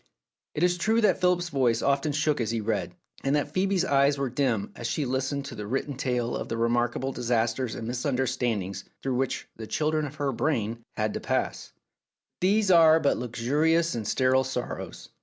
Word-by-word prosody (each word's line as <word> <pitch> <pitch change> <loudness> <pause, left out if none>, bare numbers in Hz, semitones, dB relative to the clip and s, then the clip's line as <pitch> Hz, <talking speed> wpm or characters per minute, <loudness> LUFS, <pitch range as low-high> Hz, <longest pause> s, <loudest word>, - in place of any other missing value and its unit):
It 150 - 0
is 180 0 +2
true 220 +5 +2
that 210 - +3
Philip's 180 -1 +2
voice 125 -6 +1
often 140 +2 +1
shook 150 -1 +1
as 115 - -1
he 115 0 -1
read, 100 -5 -2 0.3
and 135 +1 +2
that 145 - -1
Phoebe's 190 -1 +1
eyes 140 -2 +3
were 135 -3 -2
dim 125 -6 0
as 120 - -4
she 145 +5 -1
listened 135 +2 -2
to - - -7
the 105 -1 -6
written 135 +4 -2
tale 125 -3 -1
of - - -5
the 115 - -2
remark 120 +1 +1
able 135 +1 -2
disasters 120 0 -1
and 115 - -5
misunderstandings 125 -6 -1 0.2
through 135 - -1
which 135 0 -2
the 110 -1 -7
children 155 +2 0
of 145 - -10
her 145 -2 -1
brain 115 -3 -1 0.2
had 105 0 0
to - - -3
pass; - - -2
but - - -46 0.7
these 205 0 +3
were 165 -2 +7
but 145 -3 +2
luxurious 150 +8 +1
and 110 -3 -4
sterile 130 +2 +3
sorrows. 130 -2 -5
130 Hz, 195 wpm, -27 LUFS, 115-150 Hz, 0.7 s, were